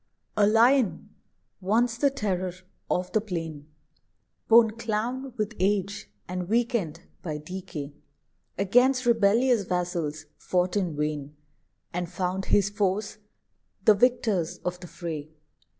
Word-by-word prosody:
A 205 -1 +4
Lion, 235 +1 +3 0.5
once 230 +5 +2
the 280 - +4
terror 190 -8 -2 0.4
of 180 0 -1
the 215 - +2
plain 165 -7 -5 0.8
(Borne 225 -1 +7
clown 230 +4 -3
with 215 +1 -1
age, 200 - 0 0.2
and 180 0 -4
weakened 225 - 0 0.2
by 155 -4 -4
decay) 155 -3 -7 0.6
Against 250 +7 +3
rebellious 230 +1 +4
vassals 175 -4 -2
fought 180 +1 0
in 180 -6 0
vain, 150 -1 -3 0.6
And 175 0 -2
found 185 +1 -2
his 200 -1 +3
foes 205 +1 -1 0.7
the 215 - +8
victors 210 -6 +1
of 180 0 -2
the 175 - -9
fray. 155 -4 -6
195 Hz, 120 wpm, -27 LUFS, 175-225 Hz, 0.8 s, the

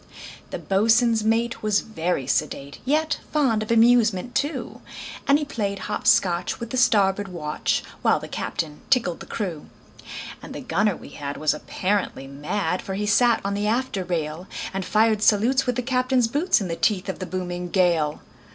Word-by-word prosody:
The - - -4
boatswain's 225 +3 +3
mate 230 +1 0
was 210 -1 +2
very 175 - -2
sedate, 140 +2 -2
Yet 305 +3 +1
fond 260 -8 +2
of 215 - -5
amusement, 230 -2 +4
too; 270 -1 -2 0.5
And 280 - +6
he 300 - -3
played 200 -7 -2
hop 210 +2 -4
scotch 185 -6 +3
with 235 - -6
the 255 - -2
starboard 205 -4 +3
watch, 155 -5 -2 0.2
While - - +3
the - - -8
captain 150 -2 -4
tickled 235 -10 +2
the - - -10
crew. 175 -8 -4 0.7
And - - -9
the - - -5
gunner - - +1
we - - -12
had 145 -1 -6
was 155 -1 +2
apparently 185 -1 -2
mad, 160 +6 -2
For 190 - -5
he 210 +1 -2
sat 230 +3 +4
on 200 - 0
the 205 +1 -1
after 230 -4 0
rail, 170 0 -3 0.3
And 195 0 -2
fired 215 +1 +2
salutes 240 +6 +3
with 250 - +1
the 250 - -2
captain's 255 -1 +2
boots, 295 +10 +2
In 195 - -3
the 165 - -3
teeth 200 +1 +1
of 190 - -4
the 185 - -5
booming 180 -1 -4
gale. 170 -5 +2
210 Hz, 180 wpm, -24 LUFS, 180-235 Hz, 0.7 s, And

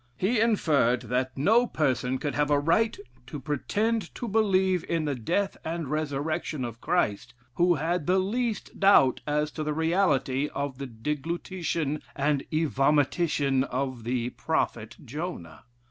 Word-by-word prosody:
He 215 - +1
inferred 150 - +2
that 125 +2 -2
no 225 - +4
person 130 - 0
could 145 +1 -3
have 150 0 +1
a 145 - +4
right 190 - +2 0.3
to 145 +3 -6
pretend 205 - -1
to 240 - -4
believe 190 -4 +2
in 165 -2 0
the 145 - 0
death 175 - -1
and 160 -3 -4
resurrection 150 -2 -2
of 115 -1 -8
Christ, 130 - 0 0.2
who 175 +4 +3
had 160 +2 -1
the 185 +1 +4
least 215 +3 -2
doubt 195 -10 +5
as 150 0 0
to 155 - -4
the 150 0 -2
reality 160 -5 +1
of 140 -2 -3
the 140 - -4
deglutition 150 +4 -3
and 145 0 +1
evomition 145 -2 +2
of 130 -2 -3
the 120 +1 -1
prophet 115 -8 -2
Jonah. 120 - -6
150 Hz, 145 wpm, -27 LUFS, 135-180 Hz, 0.3 s, doubt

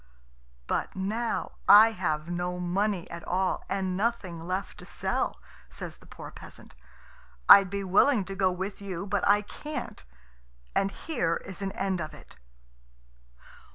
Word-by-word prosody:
"But - - -2
now 215 +5 -2 0.2
I 215 +3 +9
have 160 -6 -2
no 175 +1 -3
money 185 +1 -1
at 170 0 -7
all, 185 +1 0
and 190 -2 -1
nothing 200 -5 -1
left 185 +3 -4
to - - -10
sell," - - -2 0.3
says - - -8
the - - -19
poor - - -10
peasant. - - -13 0.7
"I'd 195 -2 +9
be 200 +1 -3
willing 205 +9 +4
enough 185 - -7
to 195 - -4
go 190 -1 +2
with 190 +3 -5
you, 195 -2 -5
but 205 -1 -1
I 205 +1 +4
can't, 295 - -7 0.7
and 195 - +2
here 195 - -1
is 190 0 -9
an 195 -1 -2
end 190 -3 -1
of 155 - -6
it." - - -16
190 Hz, 155 wpm, -28 LUFS, 180-205 Hz, 0.7 s, I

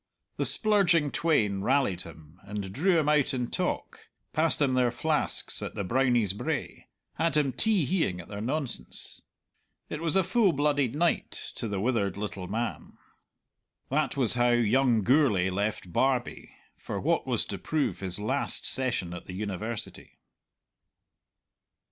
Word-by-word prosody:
The - - +1
splurging 180 - +4
twain 105 -12 +1
rallied 125 -7 +1
him 80 0 -13
and 100 -1 -6
drew 175 - +2
him 155 -2 +1
out 150 -3 +2
in 125 -2 -3
talk, - - -3 0.2
passed 155 +1 +3
him 140 -3 +2
their 125 -1 +3
flasks 150 +6 0
at - - -5
the 100 - -2
Brownie's 120 -2 +2
Brae, 100 - -4 0.3
had 160 -2 +2
him 140 -3 +1
tee 200 - +2
heeing 160 - 0
at 85 - -10
their 100 0 -6
nonsense. 130 - -4 0.7
It 150 - -5
was 165 0 0
a 190 - +5
full 190 0 +3
blooded 145 -3 +1
night 170 +2 +1 0.3
to - - -3
the 100 -2 -3
withered 100 -4 0
little 100 -3 -5
man. 115 +3 -4 1.0
That 145 -1 0
was 125 -5 +3
how 120 0 +2
young 120 0 +3
Gourlay 115 -8 +3
left 100 -2 -3
Barbie 130 +1 -1 0.2
for - - -5
what - - 0
was - - 0
to - - -6
prove 140 - -1
his 95 -2 -3
last 130 +7 -1
session 120 -10 0
at 90 - -8
the 95 - -8
University. 105 +3 -5
125 Hz, 150 wpm, -28 LUFS, 100-150 Hz, 1.0 s, a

